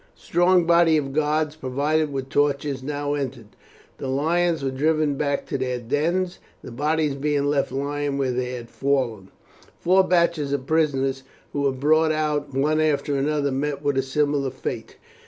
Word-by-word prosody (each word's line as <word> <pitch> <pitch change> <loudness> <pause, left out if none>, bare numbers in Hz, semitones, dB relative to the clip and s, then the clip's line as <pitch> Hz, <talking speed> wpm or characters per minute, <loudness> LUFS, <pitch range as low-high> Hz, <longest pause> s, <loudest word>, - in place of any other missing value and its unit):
A - - -27
strong 175 +1 +3
body 170 -1 +5
of 135 -2 -2
guards 155 0 0
provided 150 +2 0
with 135 -1 -4
torches 140 -1 0
now 145 +1 -2
entered. 130 -6 -4 0.5
The - - -4
lions 160 +3 +1
were 135 - 0
driven 155 +2 +1
back 140 0 -1
to - - -3
their 125 -1 -1
dens, 165 +9 -1 0.2
the - - -9
bodies 150 +3 0
being 145 0 0
left 145 -2 +1
lying 140 +1 -2
where 135 -2 0
they 125 0 -2
had 120 -2 -8
fallen. 125 -8 -1 0.5
Four 190 +2 +4
batches 170 -5 +1
of 135 -2 -2
prisoners 135 -4 +1 0.3
who 145 - -1
were 140 -1 +2
brought 155 +4 +2
out 150 -2 -1
one 150 +4 +1
after 145 -2 +1
another 140 0 0
met 140 +2 -2
with 145 -1 +1
a 135 - +2
similar 140 +1 0
fate. 130 - -6
145 Hz, 170 wpm, -23 LUFS, 135-155 Hz, 0.5 s, body